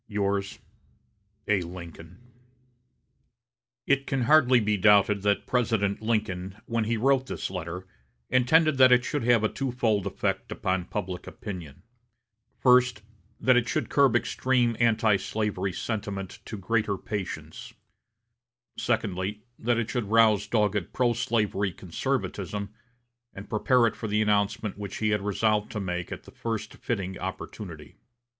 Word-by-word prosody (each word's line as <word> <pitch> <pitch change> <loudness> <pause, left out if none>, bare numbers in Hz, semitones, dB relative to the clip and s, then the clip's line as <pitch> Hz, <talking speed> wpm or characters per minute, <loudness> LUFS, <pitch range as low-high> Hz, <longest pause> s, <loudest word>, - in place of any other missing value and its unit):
"Yours, 100 -1 -1 0.9
"A. 105 -3 +2
LINCOLN." 85 -1 -9 1.7
It 140 0 +1
can 135 -3 0
hardly 130 -2 +5
be 105 -1 +1
doubted 100 0 +4
that 100 0 +1
President 110 -5 0
Lincoln, 100 -4 -2
when 115 -1 -1
he 115 +1 0
wrote 135 +2 +2
this - - -4
letter, 90 0 -5 0.4
intended 140 +4 +3
that 130 -1 +8
it 125 -1 +5
should 145 -4 -2
have 120 -2 +4
a - - +4
twofold 115 -6 -1
effect 100 - -2
upon 95 -1 -1
public 90 0 -5
opinion: 90 - -8 0.7
first, 125 -3 +4 0.4
that 130 +2 +4
it 120 -3 +2
should - - -1
curb 140 -4 +4
extreme 120 -1 +1
antislavery 105 -3 +1
sentiment 100 -1 -4
to 110 - -6
greater 105 +1 0
patience; 100 -1 -6 1.0
secondly, 105 -3 -1 0.2
that 120 +1 +1
it 115 -2 -2
should 115 -3 -2
rouse 110 -2 +4
dogged 105 -4 0
pro 120 -2 +2
slavery 105 -4 0
conservatism, 100 +3 -3 0.6
and 100 +2 -10
prepare 120 +3 +3
it 115 - 0
for 110 - -5
the 105 +1 +1
announcement 105 0 0
which 100 -2 -5
he 110 - 0
had 105 -1 +1
resolved 105 +1 0
to 105 - -4
make 90 -3 -3
at - - -6
the - - -14
first 115 -2 -4
fitting 95 -5 -3
opportunity. 90 -4 -7
105 Hz, 135 wpm, -27 LUFS, 100-120 Hz, 1.7 s, that